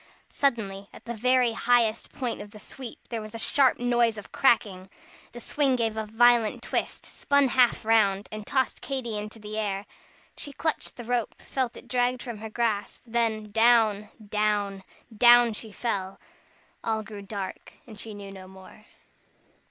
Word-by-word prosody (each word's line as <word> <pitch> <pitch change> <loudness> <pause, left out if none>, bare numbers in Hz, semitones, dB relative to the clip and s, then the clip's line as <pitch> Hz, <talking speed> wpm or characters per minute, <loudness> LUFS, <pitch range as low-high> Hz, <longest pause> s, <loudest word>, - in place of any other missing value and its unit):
Suddenly, 200 -8 -1
at - - -15
the 235 - -4
very 250 +1 +3
highest 230 -1 +1
point 250 -4 -4
of 205 - -9
the 210 - -13
sweep, 240 +3 -10
there 230 -2 -3
was 215 +1 -9
a - - -3
sharp 265 +3 +4
noise 240 -2 +2
of 205 - -10
cracking. 200 -7 +2 0.4
The 240 - -9
swing 270 +2 +1
gave 225 -3 -1
a 220 -1 -3
violent 235 0 +3
twist, - - -3
spun 280 -2 +1
half 245 -3 +3
round, 205 -3 +3
and 215 -1 -7
tossed 265 -2 0
Katy 255 -5 -3
into 210 +2 -6
the 215 0 -6
air. 200 -1 -2 0.5
She 285 - -5
clutched 315 +2 -2
the 240 - -8
rope, 240 -1 -2
felt 255 -3 -3
it - - -13
dragged 250 0 0
from 235 -4 -7
her 220 +1 -7
grasp, 215 -2 -2
then, 225 -3 -1
down, 225 -2 +4 0.2
down 205 -2 0 0.3
down 240 +1 +7
she 215 +1 -5
fell. 195 -4 -3 0.6
All 220 -1 -1
grew 210 -1 -9
dark, 200 -1 -7
and 215 -3 -12
she 220 -1 -6
knew 200 -1 -9
no 190 -1 -11
more. 190 +3 -15
225 Hz, 165 wpm, -26 LUFS, 210-240 Hz, 0.6 s, down